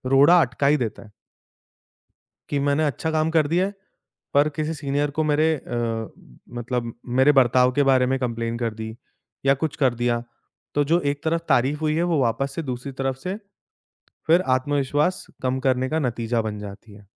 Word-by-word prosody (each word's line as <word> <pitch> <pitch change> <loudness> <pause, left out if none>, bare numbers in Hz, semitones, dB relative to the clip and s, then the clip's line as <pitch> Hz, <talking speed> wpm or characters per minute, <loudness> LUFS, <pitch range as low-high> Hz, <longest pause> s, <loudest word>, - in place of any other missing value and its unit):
रोड़ा 155 +6 +7
अटका 135 0 0
ही 150 +2 +4
देता 120 -6 -4
है। 105 - -17 1.4
कि 145 - 0
मैंने 145 +2 +1
अच्छा 155 +2 -2
काम 155 0 +1
कर 160 -2 +3
दिया 175 +5 +2
है, 200 - -5 0.6
पर 145 +2 +4
किसी 155 +1 -1
सीनियर 145 -1 -1
को - - +3
मेरे 155 +1 +2
अ, 115 -4 -3 0.5
मतलब 120 -1 -3 0.3
मेरे 145 +3 +6
बर्ताव 125 +1 +3
के 145 +2 +3
बारे 130 -1 +4
में - - +1
कंप्लेन 115 -2 -2
कर 115 -2 -2
दी 110 0 -6 0.5
या 135 - +6
कुछ 160 - -1
कर 130 -2 +4
दिया, 120 0 0 0.5
तो 145 - +3
जो 165 +4 +2
एक 145 0 -8
तरफ 165 +1 0
तारीफ़ 135 +5 +2
हुई 155 0 +1
है 170 - +1
वो 155 - +2
वापस 130 +3 0
से - - -2
दूसरी 130 0 -5
तरफ 135 -1 0
से, 185 +6 -4 0.9
फिर 165 +3 +5 0.2
आत्मविश्वास 145 +5 0 0.2
कम 130 0 0
करने 130 0 +1
का 160 - 0
नतीजा 120 -4 -1
बन 105 -1 -4
जाती 105 +1 -10
है। 100 0 -16
135 Hz, 185 wpm, -23 LUFS, 120-150 Hz, 1.4 s, रोड़ा